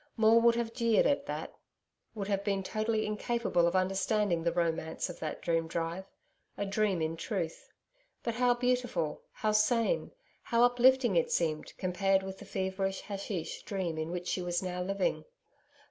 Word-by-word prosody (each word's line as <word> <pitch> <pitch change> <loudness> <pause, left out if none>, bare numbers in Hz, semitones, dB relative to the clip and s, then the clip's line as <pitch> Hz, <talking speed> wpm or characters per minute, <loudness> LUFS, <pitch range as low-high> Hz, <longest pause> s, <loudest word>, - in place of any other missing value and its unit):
Maule 225 +1 +6
would 235 0 +5
have 235 -1 -2
jeered 230 -2 +3
at 285 0 +1
that - - -4 0.6
would 200 -2 -3
have 200 -1 0
been 195 -2 0
totally 215 +2 -1
incapable 210 -4 +1
of 170 - 0
understanding 190 0 +1
the 170 +1 +1
romance 165 0 -1
of - - -12
that 155 -1 -5
dream 165 -1 +1
drive 165 +3 -3 0.5
a 200 - -1
dream 195 -4 +1
in 160 +1 -1
truth. 170 -2 -4 0.5
But 235 - -1
how 245 +1 +3
beautiful, 245 -10 0
how 215 - -1
sane, 230 - +2 0.3
how 235 0 +2
uplifting 245 -2 +4
it 165 - +2
seemed, 155 -3 -1
compared 190 +1 +1
with 190 0 -7
the 205 - -10
feverish 190 0 -2
haschisch 195 -4 -5
dream 180 -5 -3
in 155 +1 -3
which 180 +1 -4
she 185 - -1
was 175 +1 -1
now 180 -1 -3
living. 195 +1 -1
195 Hz, 165 wpm, -31 LUFS, 175-225 Hz, 0.6 s, Maule